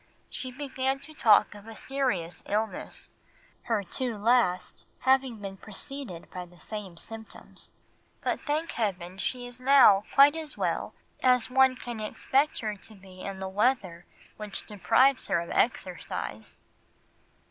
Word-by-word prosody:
She 255 Hz, -, -5 dB
began 265 Hz, 0 st, -2 dB
to 310 Hz, +2 st, -12 dB
talk 215 Hz, -8 st, +5 dB
of 205 Hz, +1 st, -13 dB
a 225 Hz, -, -9 dB
serious 205 Hz, -14 st, -2 dB
illness, 215 Hz, +2 st, -3 dB, 0.5 s
her 225 Hz, -4 st, 0 dB
two 240 Hz, +4 st, -3 dB
last 215 Hz, -4 st, +1 dB
having 265 Hz, -2 st, +3 dB
been 195 Hz, -2 st, -7 dB
preceded 215 Hz, -3 st, -6 dB
by 180 Hz, -1 st, -6 dB
the 175 Hz, 0 st, -19 dB
same 200 Hz, -3 st, -7 dB
symptoms, 220 Hz, +4 st, -4 dB, 0.5 s
but -, -, -1 dB
thank 310 Hz, +3 st, -1 dB
heaven 190 Hz, -4 st, -3 dB
she 245 Hz, +4 st, -2 dB
is 245 Hz, 0 st, -9 dB
now 255 Hz, -7 st, +7 dB
quite 280 Hz, +2 st, +8 dB
as 315 Hz, -2 st, -4 dB
well -, -, -1 dB, 0.3 s
as 250 Hz, -1 st, +3 dB
one 265 Hz, 0 st, +5 dB
can 240 Hz, -2 st, -6 dB
expect 270 Hz, +7 st, 0 dB
her 215 Hz, -2 st, -2 dB
to 215 Hz, +2 st, -12 dB
be 190 Hz, -1 st, -14 dB
in 195 Hz, -1 st, -5 dB
the 190 Hz, -, -3 dB
weather 190 Hz, -4 st, 0 dB, 0.3 s
which 210 Hz, -2 st, -6 dB
deprives 240 Hz, +6 st, +3 dB
her 190 Hz, -4 st, +2 dB
of 170 Hz, -, -6 dB
exercise." 180 Hz, -, -2 dB
225 Hz, 145 wpm, -28 LUFS, 195-260 Hz, 0.5 s, quite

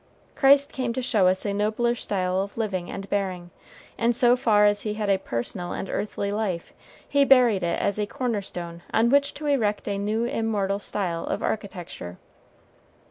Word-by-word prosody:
Christ 280 Hz, 0 st, +5 dB
came 250 Hz, -3 st, -2 dB
to 255 Hz, -, -2 dB
show 210 Hz, -6 st, +3 dB
us 185 Hz, +2 st, +1 dB
a 200 Hz, -, 0 dB
nobler 215 Hz, +4 st, +1 dB
style 185 Hz, -5 st, -1 dB
of 200 Hz, +2 st, -6 dB
living 190 Hz, -6 st, -2 dB
and 195 Hz, -, -6 dB
bearing; 185 Hz, -4 st, -2 dB, 0.5 s
and 235 Hz, 0 st, +2 dB
so 245 Hz, 0 st, +5 dB
far 210 Hz, -4 st, +4 dB
as 205 Hz, 0 st, +3 dB
he 210 Hz, -1 st, -3 dB
had 210 Hz, -2 st, 0 dB
a 190 Hz, -, +2 dB
personal 175 Hz, +7 st, -4 dB
and -, -, -4 dB
earthly 200 Hz, -1 st, -2 dB
life, 205 Hz, -5 st, -3 dB, 0.3 s
he 285 Hz, 0 st, +3 dB
buried 250 Hz, -7 st, +5 dB
it 170 Hz, -1 st, -1 dB
as 200 Hz, +1 st, 0 dB
a 210 Hz, -, 0 dB
corner 235 Hz, -2 st, -2 dB
stone 170 Hz, -3 st, -7 dB
on 230 Hz, +2 st, +3 dB
which 280 Hz, 0 st, +3 dB
to 300 Hz, +1 st, -7 dB
erect 225 Hz, -8 st, 0 dB
a 200 Hz, -1 st, -1 dB
new 215 Hz, +3 st, 0 dB
immortal 210 Hz, -4 st, -1 dB
style 180 Hz, -5 st, -3 dB
of -, -, -2 dB
architecture. 175 Hz, -, -5 dB
205 Hz, 185 wpm, -25 LUFS, 190-235 Hz, 0.5 s, Christ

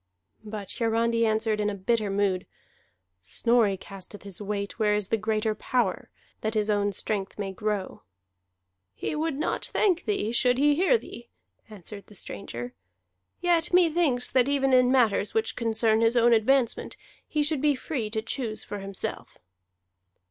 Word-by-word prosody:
But 210 Hz, -2 st, -6 dB
Hiarandi 230 Hz, 0 st, +2 dB
answered 220 Hz, 0 st, 0 dB
in 210 Hz, -1 st, -1 dB
bitter 215 Hz, +2 st, 0 dB
mood: 195 Hz, -2 st, 0 dB, 0.7 s
"Snorri 225 Hz, -, +2 dB
casteth 195 Hz, +1 st, -10 dB
his 200 Hz, -1 st, -8 dB
weight 200 Hz, +1 st, -4 dB
where 210 Hz, -1 st, +3 dB
is 210 Hz, -2 st, -1 dB
the -, -, +3 dB
greater 215 Hz, 0 st, 0 dB
power, 215 Hz, -2 st, -1 dB, 0.3 s
that 220 Hz, +1 st, -2 dB
his 215 Hz, 0 st, +1 dB
own 205 Hz, 0 st, +1 dB
strength 195 Hz, 0 st, -3 dB
may 195 Hz, -2 st, -4 dB
grow." 205 Hz, -1 st, -3 dB, 0.9 s
"He -, -, -3 dB
would 310 Hz, -1 st, -1 dB
not 310 Hz, -, -1 dB
thank 365 Hz, -5 st, +1 dB
thee 395 Hz, -, -1 dB
should 250 Hz, +1 st, +2 dB
he 290 Hz, +2 st, +4 dB
hear 380 Hz, +10 st, +4 dB
thee," 235 Hz, -, -11 dB, 0.4 s
answered 200 Hz, -1 st, -10 dB
the 210 Hz, -, -15 dB
stranger. 120 Hz, -11 st, -7 dB, 0.7 s
"Yet 345 Hz, -1 st, +2 dB
methinks 325 Hz, -8 st, +3 dB
that 255 Hz, +1 st, +3 dB
even 270 Hz, -2 st, +2 dB
in 250 Hz, 0 st, +5 dB
matters 225 Hz, -6 st, +2 dB
which 225 Hz, 0 st, 0 dB
concern 225 Hz, -1 st, +2 dB
his 230 Hz, +2 st, +3 dB
own 240 Hz, 0 st, +5 dB
advancement, 235 Hz, +2 st, +1 dB, 0.3 s
he 300 Hz, -1 st, 0 dB
should 295 Hz, -2 st, 0 dB
be 295 Hz, -1 st, +3 dB
free 255 Hz, -4 st, -3 dB
to 220 Hz, 0 st, -2 dB
choose 230 Hz, -2 st, -3 dB
for 205 Hz, -, -6 dB
himself." 195 Hz, -1 st, -5 dB
220 Hz, 155 wpm, -27 LUFS, 205-255 Hz, 0.9 s, in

